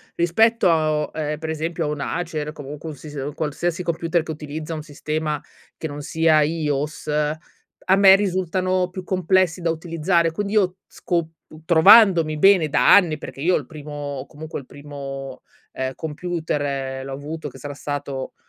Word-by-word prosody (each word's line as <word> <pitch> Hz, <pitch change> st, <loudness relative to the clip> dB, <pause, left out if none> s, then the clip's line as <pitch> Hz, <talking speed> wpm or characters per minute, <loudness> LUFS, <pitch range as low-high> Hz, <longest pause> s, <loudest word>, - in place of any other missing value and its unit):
rispetto, 220 Hz, +6 st, +3 dB
a 155 Hz, -2 st, +3 dB
o 150 Hz, -, -4 dB
ehm, 150 Hz, -1 st, -2 dB
per 160 Hz, 0 st, -5 dB
esempio, 160 Hz, +1 st, -2 dB
a -, -, -1 dB
un 150 Hz, -1 st, -3 dB
Acer 155 Hz, -2 st, -3 dB
comunque 145 Hz, +1 st, -8 dB
un 150 Hz, -, -7 dB
sis 150 Hz, +1 st, -11 dB
un 140 Hz, +1 st, -4 dB
qualsiasi 165 Hz, +3 st, -2 dB
computer 170 Hz, 0 st, 0 dB
che 160 Hz, -, -5 dB
utilizza 155 Hz, +1 st, -6 dB
un 155 Hz, -, -4 dB
sistema 150 Hz, 0 st, -3 dB, 0.4 s
che 160 Hz, -, -4 dB
non 145 Hz, 0 st, -7 dB
sia 160 Hz, +1 st, +3 dB
iOS, 150 Hz, -1 st, -2 dB
a 150 Hz, +5 st, -2 dB
me 195 Hz, -1 st, +8 dB
risultano 185 Hz, -1 st, 0 dB
più 185 Hz, +1 st, -7 dB
complessi 185 Hz, -1 st, +1 dB
da 170 Hz, -, 0 dB
utilizzare 165 Hz, +1 st, 0 dB
quindi 200 Hz, +5 st, -3 dB
io 190 Hz, -4 st, +2 dB
sco 170 Hz, -2 st, -1 dB
p 160 Hz, -, -23 dB, 0.3 s
trovandomi 170 Hz, -2 st, +6 dB
bene 190 Hz, -2 st, +5 dB
da -, -, +5 dB
anni, 170 Hz, -6 st, +4 dB
perché 135 Hz, -3 st, -9 dB
io, 180 Hz, +4 st, +3 dB
il 145 Hz, -, -2 dB
primo 150 Hz, +1 st, -10 dB
o 145 Hz, -2 st, -5 dB
comunque, 155 Hz, +1 st, -8 dB
il 135 Hz, -, -12 dB
primo, 135 Hz, -2 st, -8 dB, 0.3 s
ehm, 130 Hz, 0 st, -2 dB
computer, 145 Hz, -5 st, -3 dB
l'ho 135 Hz, -, -6 dB
avuto 150 Hz, +3 st, -6 dB
che 130 Hz, -, -14 dB
sarà 145 Hz, +1 st, -7 dB
stato 140 Hz, -2 st, -5 dB
155 Hz, 170 wpm, -22 LUFS, 145-175 Hz, 0.4 s, me